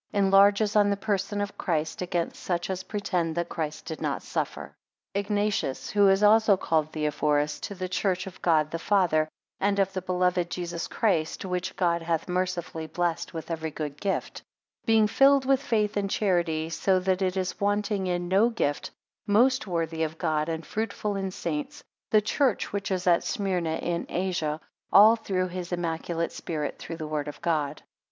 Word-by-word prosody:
4 - - -2
Enlarges 200 +2 +4
on 205 -1 +5
the 200 - +1
person 205 0 -1
of 205 0 -5
Christ, 160 -1 -1
against 175 -2 -2
such 175 +1 -2
as 185 -1 -3
pretend 180 -5 -2
that 170 0 -2
Christ 155 -2 -4
did 160 - -6
not - - -2
suffer. - - -4 0.4
IGNATIUS, 205 -7 -1
who 205 -1 +5
is 195 +2 +3
also 215 -1 +6
called 155 -3 0
Theohorus, 150 -1 0
to 200 - -5
the 185 0 -4
church 185 0 -1
of 190 -1 -10
God 155 -3 +2
the 165 - -3
Father, 165 -5 +2 0.3
and 200 +1 +1
of 195 -1 +1
the 185 - -2
beloved 180 -1 0
Jesus 170 -1 -4
Christ, 180 -6 0
which 180 0 -3
God 170 -2 +1
hath 165 -1 -1
mercifully 180 -3 -2
blessed 170 0 -2
with 160 +1 -6
every 160 -1 -2
good 150 -2 -5
gift; 195 -1 -2 0.5
being 220 -1 +5
filled 275 +5 +4
with 270 0 +3
faith 215 -6 0
and 200 -1 0
charity, 170 -6 0
so 185 +3 +2
that 185 +1 0
it 185 0 0
is 185 +1 -2
wanting 205 -1 0
in 175 -1 -1
no 195 +6 +4
gift; 145 -11 -1 0.4
most 240 +3 +3
worthy 165 -2 -2
of 160 0 -2
God, 155 -2 0
and 160 -1 -4
fruitful 210 -1 -3
in 195 -1 -2
saints; 165 -6 -4 0.3
the 215 - +5
church 245 +2 0
which 200 -1 -2
is 185 -2 -1
at 175 -2 +4
Smyrna 180 -5 -1
in 170 +1 -2
Asia; 170 -5 -1 0.3
all 215 +3 +8
through 185 -5 -2
his 180 0 -6
immaculate 170 -1 -2
spirit, 150 -3 -4
through 165 - -6
word 150 -1 -3
of 150 - -7
God. 150 -3 -1
180 Hz, 175 wpm, -27 LUFS, 165-200 Hz, 0.5 s, all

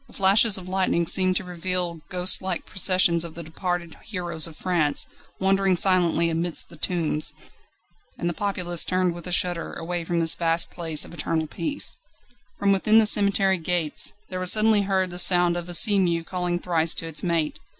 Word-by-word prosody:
The - - -19
flashes 200 +2 +4
of 185 -1 -10
lightning 185 -2 -1
seemed 185 +2 +4
to - - -2
reveal 180 -1 -3
ghostlike 180 0 0
processions 185 -3 +2
of 170 -2 -9
the 170 - -7
departed 170 +1 -5
heroes 175 -6 -2
of 160 - -14
France, 170 -6 0 0.3
wandering 195 0 +2
silently 175 -2 +2
amidst 165 +1 +1
the 170 - -14
tombs. 155 -3 -1 0.8
And 175 - -4
the 175 - -2
populace 180 -3 0
turned 185 -1 -1
with 175 +1 -9
a - - -5
shudder 175 -1 -1
away 175 +1 -5
from 170 +1 -3
this 165 -1 +2
vast 165 0 0
place 160 -3 -1
of - - -14
eternal 160 0 -3
peace. 170 - 0 0.6
From 200 0 0
within 210 +3 +2
the 225 - +5
cemetery 200 -2 +3
gates, 165 -2 -1 0.2
there 185 - -6
was 185 0 +2
suddenly 215 -1 +3
heard 190 -2 -1
the 175 - -4
sound 175 -1 +3
of 175 0 -6
a 175 - -1
sea 200 +4 +4
mew 170 -3 -1
calling 180 0 -3
thrice 170 -2 0
to 165 - -2
its 160 -2 +1
mate. 165 -4 -2
175 Hz, 185 wpm, -23 LUFS, 170-185 Hz, 0.8 s, the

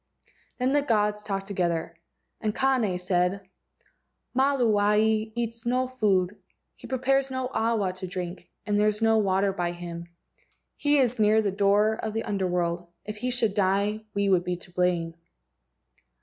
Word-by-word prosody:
Then 255 +2 +1
the 290 - +4
gods 210 -5 +1
talked 195 -2 -3
together, 175 -4 -2 0.5
and 215 -1 -1
Kane 250 -9 +1
said: 180 +1 0 0.9
"Maluae 220 -5 +2
eats 230 -1 -3
no 255 +2 +1
food, 205 -6 0 0.3
he - - -12
prepares 270 +1 +1
no 260 -1 -3
awa 220 -5 0
to 185 0 -7
drink, 180 0 -6 0.2
and 205 -1 +1
there 210 - +4
is 210 +1 0
no 225 0 +4
water 195 -1 +1
by 175 -2 -2
him. 170 -1 -7 0.7
He 290 0 +2
is 250 -3 +2
near 215 +1 +4
the 200 - 0
door 205 +2 +3
of 220 - -3
the 225 - -2
Under 195 -3 -1
world. 175 -1 -1 0.2
If 210 +1 -6
he 250 +4 -2
should 240 -5 0
die, 200 +2 +1
we 200 0 +1
would 185 -2 +3
be 180 0 -2
to 175 0 -13
blame." 175 -2 0
210 Hz, 160 wpm, -26 LUFS, 185-230 Hz, 0.9 s, the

